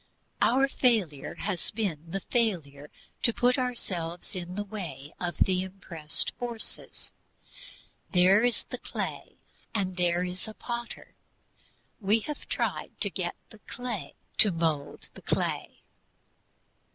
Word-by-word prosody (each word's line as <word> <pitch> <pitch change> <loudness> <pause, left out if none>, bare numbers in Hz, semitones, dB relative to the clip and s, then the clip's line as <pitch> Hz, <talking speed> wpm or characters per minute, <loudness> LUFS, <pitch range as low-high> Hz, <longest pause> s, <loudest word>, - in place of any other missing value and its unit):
Our 270 +3 +5
failure 215 - +2
has 185 -5 -1
been 170 -7 -2
the 195 +3 -2
failure 160 - 0 0.3
to 235 - +5
put 250 +3 +4
ourselves 180 -9 -3
in 180 0 -4
the 205 - -1
way 170 -9 -6
of 175 -1 -2
the 185 -1 +4
impressed 180 -5 -1
forces. 235 -2 -4 1.0
There 190 +3 +6
is 245 -1 +2
a - - -3
clay, - - -4 0.4
and 190 -3 0
there 175 0 +3
is 180 +3 -3
a 215 - -7
Potter; 235 -1 -5 0.9
we 215 +1 +3
have 300 +6 -6
tried - - -1
to - - +3
get - - -2 0.2
the - - -13
clay 245 -5 -5 0.2
to 210 - +9
mould 160 -4 -1
the - - -12
clay. - - -1
190 Hz, 130 wpm, -29 LUFS, 170-230 Hz, 1.0 s, to